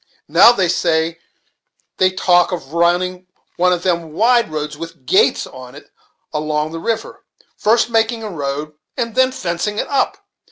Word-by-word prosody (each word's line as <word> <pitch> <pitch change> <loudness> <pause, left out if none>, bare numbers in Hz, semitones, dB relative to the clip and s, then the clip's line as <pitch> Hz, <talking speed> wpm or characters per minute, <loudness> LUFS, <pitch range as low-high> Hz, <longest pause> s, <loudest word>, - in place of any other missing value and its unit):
Now, - - +7
they 190 -7 +1
say, 165 -2 0 0.8
they 185 - +4
talk 180 -1 +2
of 165 -5 -6
running 180 +2 0 0.3
one 180 +1 +3
of 175 -1 -1
them 170 -4 -1
wide 235 +2 +3
roads 150 -1 -4
with 165 +2 -10
gates 395 +5 +3
on - - -12
it - - -15 0.4
along 150 0 -1
the 165 - -6
river; 225 +5 -4 0.3
first 225 +1 +2
making 225 0 +1
a 215 - -5
road, 150 -1 -4 0.2
and 230 -3 -2
then 260 +1 +3
fencing 185 -1 -3
it - - -1
up! 280 - 0
180 Hz, 160 wpm, -18 LUFS, 160-220 Hz, 0.8 s, Now